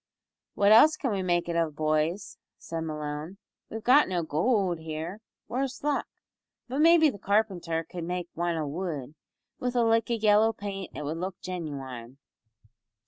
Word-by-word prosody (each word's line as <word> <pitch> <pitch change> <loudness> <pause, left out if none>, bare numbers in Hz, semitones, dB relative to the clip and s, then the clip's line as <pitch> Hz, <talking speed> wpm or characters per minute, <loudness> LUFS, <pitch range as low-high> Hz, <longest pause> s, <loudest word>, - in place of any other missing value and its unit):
"What 200 +1 +4
else 305 +8 +7
can 260 - -1
we 195 -2 -1
make 175 -2 0
it 170 - -2
of, 165 -3 0
boys?" 155 +5 -1 0.2
said 165 -1 -5
Malone, 150 +2 -5 0.3
"we've 225 0 -6
got 270 +1 +5
no 175 -2 -1
goold 180 - +1
here 160 +5 -5 0.3
worse 255 +3 -3
luck! 295 -1 0 0.6
but 260 +3 -3
maybe 320 -1 +6
the 205 - -11
carpenter 190 -5 0
cud 175 -2 -6
make 180 0 -3
wan 170 0 -1
o' 155 - -1
wood. 150 -3 -4 0.5
With 250 0 -2
a 240 - +3
lick 225 0 +2
o' 235 - +2
yellow 215 0 +4
paint 195 -3 -6
it - - -5
would 155 +3 -3
look 185 +1 -5
genuine." 135 -8 -6
180 Hz, 165 wpm, -28 LUFS, 160-220 Hz, 0.6 s, else